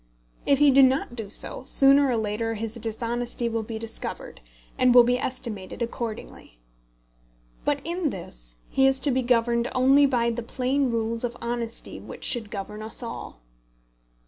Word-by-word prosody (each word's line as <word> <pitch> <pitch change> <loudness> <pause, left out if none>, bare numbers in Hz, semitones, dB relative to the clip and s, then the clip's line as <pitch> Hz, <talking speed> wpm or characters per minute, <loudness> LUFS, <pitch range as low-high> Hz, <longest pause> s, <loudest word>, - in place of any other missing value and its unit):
If 280 - +5
he 290 0 +6
do 275 +1 +6
not 260 -2 +3
do 220 -4 -6
so, 210 - -4
sooner 275 +1 +5
or 250 - +1
later 225 +1 -2
his 220 0 -4
dishonesty 235 +1 -3
will 230 -1 -1
be 220 +1 -6
discovered, 225 - -5 0.3
and 250 -1 +4
will 245 - +10
be 245 +1 +1
estimated 235 -5 -4
accordingly. 230 - -6 1.1
But 290 -1 0
in 340 -1 -1
this - - -9 0.2
he 270 0 +4
is 270 0 +2
to 285 - +1
be 260 +1 +1
governed 235 -1 +1
only 270 +3 +5
by 235 -3 +1
the 235 +1 -3
plain 260 +3 0
rules 230 0 -1
of 240 0 -3
honesty 235 -1 -4
which - - -10
should 230 -4 0
govern 210 +1 -6
us 220 +3 -4
all. 230 - -7
235 Hz, 165 wpm, -25 LUFS, 225-260 Hz, 1.1 s, will